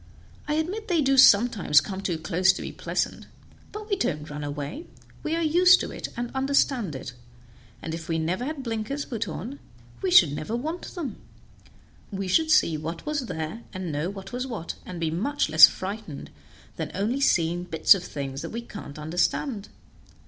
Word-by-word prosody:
I 300 Hz, -, 0 dB
admit 380 Hz, +8 st, -2 dB
they 335 Hz, -5 st, +2 dB
do 270 Hz, 0 st, +3 dB
sometimes 205 Hz, -, +6 dB
come 195 Hz, +2 st, -5 dB
too 175 Hz, -4 st, -2 dB
close 170 Hz, +4 st, +3 dB
to -, -, -6 dB
be -, -, -5 dB
pleasant, -, -, -3 dB, 0.4 s
but 425 Hz, 0 st, -8 dB
we 405 Hz, -, +1 dB
don't 150 Hz, -, -2 dB
run 150 Hz, 0 st, -5 dB
away; 145 Hz, -, -5 dB, 0.3 s
we 315 Hz, -, -1 dB
are 335 Hz, -, 0 dB
used 355 Hz, +4 st, +6 dB
to -, -, -4 dB
it, -, -, -5 dB
and 240 Hz, 0 st, -3 dB
understand 265 Hz, -, +1 dB
it, 130 Hz, -, -7 dB, 0.7 s
and 160 Hz, -, -4 dB
if 165 Hz, 0 st, -7 dB
we 165 Hz, -, +1 dB
never 170 Hz, +8 st, -1 dB
had 295 Hz, -1 st, -4 dB
blinkers 230 Hz, +4 st, -3 dB
put 230 Hz, -3 st, -4 dB
on 225 Hz, -, -6 dB, 0.4 s
we 380 Hz, -, 0 dB
should 175 Hz, -, +7 dB
never 155 Hz, +9 st, -4 dB
want 315 Hz, +8 st, -5 dB
them; 335 Hz, -7 st, -5 dB, 0.9 s
we 195 Hz, -2 st, -4 dB
should 315 Hz, -, +2 dB
see 165 Hz, -, +4 dB
what 165 Hz, +2 st, -6 dB
was 295 Hz, -4 st, -2 dB
there, 160 Hz, +6 st, -5 dB
and 185 Hz, -3 st, -4 dB
know 150 Hz, +4 st, -2 dB
what 195 Hz, +2 st, -9 dB
was 250 Hz, +2 st, -3 dB
what, 210 Hz, -10 st, -5 dB
and 180 Hz, -2 st, -6 dB
be 165 Hz, -2 st, -1 dB
much 225 Hz, -, -1 dB
less 160 Hz, 0 st, +10 dB
frightened 195 Hz, -5 st, -7 dB, 0.5 s
than -, -, -2 dB
by -, -, -8 dB
only 230 Hz, +8 st, -1 dB
seeing 175 Hz, -7 st, +2 dB
bits 165 Hz, -3 st, +5 dB
of 190 Hz, -3 st, -4 dB
things 135 Hz, -4 st, -5 dB
that -, -, -5 dB
we 235 Hz, +1 st, -5 dB
can't 155 Hz, -11 st, -9 dB
understand. 180 Hz, -, -1 dB
200 Hz, 190 wpm, -26 LUFS, -, 0.9 s, less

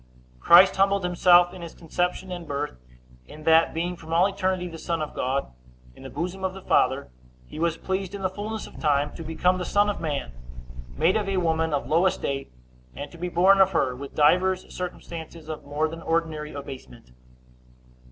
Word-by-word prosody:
Christ 180 Hz, -, +7 dB
humbled 195 Hz, 0 st, +3 dB
himself 175 Hz, 0 st, +5 dB
in 185 Hz, -, -10 dB
his 170 Hz, -1 st, -9 dB
conception 180 Hz, +3 st, -2 dB
and 175 Hz, -2 st, -6 dB
birth, 145 Hz, -, -4 dB, 0.5 s
in 155 Hz, -, -12 dB
that, 160 Hz, +1 st, +5 dB
being 175 Hz, +2 st, -2 dB
from 160 Hz, -1 st, -12 dB
all 170 Hz, +3 st, +4 dB
eternity 190 Hz, -2 st, -1 dB
the 165 Hz, -2 st, -9 dB
Son 170 Hz, 0 st, -2 dB
of 155 Hz, -1 st, -4 dB
God, 130 Hz, -, -2 dB, 0.4 s
in -, -, -16 dB
the 135 Hz, -, -8 dB
bosom 180 Hz, +7 st, -4 dB
of 190 Hz, 0 st, -2 dB
the 190 Hz, -, -9 dB
Father, 130 Hz, -, +1 dB, 0.3 s
he 110 Hz, -, -10 dB
was 165 Hz, 0 st, 0 dB
pleased 190 Hz, 0 st, -3 dB
in 195 Hz, -, -7 dB
the -, -, +3 dB
fullness 215 Hz, +2 st, -5 dB
of -, -, -12 dB
time 145 Hz, -1 st, +1 dB
to -, -, -9 dB
become 180 Hz, +3 st, 0 dB
the -, -, -2 dB
son 205 Hz, +2 st, +2 dB
of -, -, -7 dB
man, 145 Hz, -, -3 dB, 0.7 s
made 165 Hz, +5 st, +3 dB
of 210 Hz, -2 st, 0 dB
a 195 Hz, -, 0 dB
woman 160 Hz, -2 st, +1 dB
of 140 Hz, -4 st, -1 dB
low 165 Hz, +7 st, +3 dB
estate, 140 Hz, -6 st, -3 dB, 0.4 s
and 145 Hz, 0 st, -7 dB
to 170 Hz, -, -13 dB
be 180 Hz, +1 st, -3 dB
born 190 Hz, +3 st, +5 dB
of 190 Hz, 0 st, +4 dB
her; 130 Hz, -6 st, +1 dB
with 140 Hz, +2 st, -9 dB
divers 185 Hz, +5 st, +2 dB
circumstances 170 Hz, -3 st, -7 dB
of 155 Hz, -1 st, -7 dB
more 145 Hz, +2 st, 0 dB
than 165 Hz, +1 st, -8 dB
ordinary 160 Hz, -2 st, -1 dB
abasement. 130 Hz, -, -10 dB
170 Hz, 195 wpm, -25 LUFS, 150-185 Hz, 0.7 s, Christ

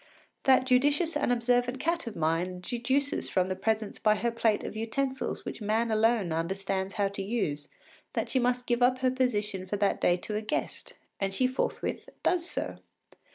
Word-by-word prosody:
That 260 Hz, -1 st, +5 dB
judicious 290 Hz, +6 st, +3 dB
and 290 Hz, -4 st, +1 dB
observant 245 Hz, +1 st, +1 dB
cat 335 Hz, -2 st, -1 dB
of 225 Hz, -, -5 dB
mine 170 Hz, +3 st, 0 dB
deduces 260 Hz, +7 st, -1 dB
from 185 Hz, -1 st, +1 dB
the 185 Hz, -, -1 dB
presence 220 Hz, +2 st, -1 dB
by 215 Hz, -1 st, +4 dB
her 235 Hz, +2 st, 0 dB
plate 225 Hz, -2 st, +1 dB
of -, -, -5 dB
utensils 260 Hz, +5 st, -2 dB
which -, -, -6 dB
man 220 Hz, +2 st, +1 dB
alone 220 Hz, -4 st, +2 dB
understands 190 Hz, +4 st, -2 dB
how 200 Hz, -2 st, +2 dB
to 200 Hz, 0 st, -5 dB
use 190 Hz, -9 st, -2 dB, 0.4 s
that -, -, -1 dB
she 260 Hz, -, +1 dB
must 250 Hz, 0 st, +1 dB
give 240 Hz, 0 st, 0 dB
up 250 Hz, +1 st, +4 dB
her 255 Hz, -1 st, +3 dB
position 210 Hz, -7 st, -1 dB
for 205 Hz, -, -2 dB
that 200 Hz, 0 st, +1 dB
day 175 Hz, -, +4 dB
to 210 Hz, +4 st, -5 dB
a 210 Hz, -, 0 dB
guest, 215 Hz, -, -4 dB, 0.2 s
and 195 Hz, -1 st, -1 dB
she 255 Hz, -, +2 dB
forthwith 255 Hz, +1 st, -2 dB
does 355 Hz, -1 st, +1 dB
so. -, -, -4 dB
225 Hz, 185 wpm, -29 LUFS, 195-255 Hz, 0.4 s, That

